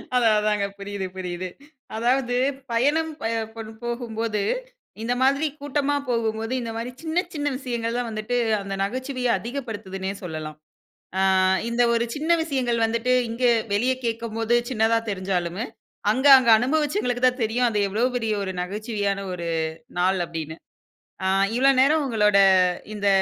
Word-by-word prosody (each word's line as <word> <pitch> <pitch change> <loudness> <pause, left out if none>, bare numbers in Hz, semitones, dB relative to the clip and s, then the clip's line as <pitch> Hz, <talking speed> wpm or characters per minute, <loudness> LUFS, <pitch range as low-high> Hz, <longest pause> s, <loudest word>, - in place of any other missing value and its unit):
அதா, 240 -2 +4
அதாங்க. 210 -1 +1
புரியுது, 200 -1 -5
புரியுது. 180 0 -4 0.5
அதாவது 245 +2 +1 0.4
பயணம் 295 +7 +2
ப - - -7 0.3
பண் 220 -1 -7
போகும்போது, 230 -3 -2 0.6
இந்த 240 +2 0
மாரி 275 +4 +3
கூட்டமா 290 0 0
போகும்போது, 225 0 -1
இந்த 230 -1 -4
மாரி 240 +2 -4
சின்ன, 335 +3 0
சின்ன 290 -1 -2
விஷயங்கள் 235 -3 -3
தான் 245 -2 -2
வந்துட்டு 215 +3 -3 0.3
அந்த 195 0 -5
நகைச்சுவைய 255 +3 -2
அதிகப்படுத்துதுனே 210 -7 -5
சொல்லலாம். 155 -3 -6 0.6
ஆ, - - +3 0.5
இந்த 235 +1 +1
ஒரு 235 0 +1
சின்ன 315 +3 -1
விஷயங்கள் 245 -6 0
வந்துட்டு 230 +2 0 0.2
இங்க 235 +3 -4 0.3
வெளிய 245 +6 +2
கேட்கும்போது 230 0 -1
சின்னதா 225 -1 +2
தெரிஞ்சாலும், 185 -1 -2 0.5
அங்க 265 +5 +2
அங்க 245 -3 +2
அனுபவச்சங்களுக்கு 265 - 0
தான் 250 0 -1
தெரியும், 240 +3 +1
அது 210 -2 -1
எவ்வளவு 230 +6 +1
பெரிய 225 -2 -1
ஒரு 190 -1 -3
நகைச்சுவையான 205 +1 -2
ஒரு 170 -1 -5 0.5
நாள் 185 +1 +2
அப்டின்னு. 160 -1 -6 0.7
ஆ - - +1 0.3
இவ்வளவு 270 +1 +4
நேரம் 300 +2 +4
உங்களோட 210 -5 +3 0.6
இந்த 205 -1 -2
230 Hz, 135 wpm, -24 LUFS, 205-255 Hz, 0.7 s, அதா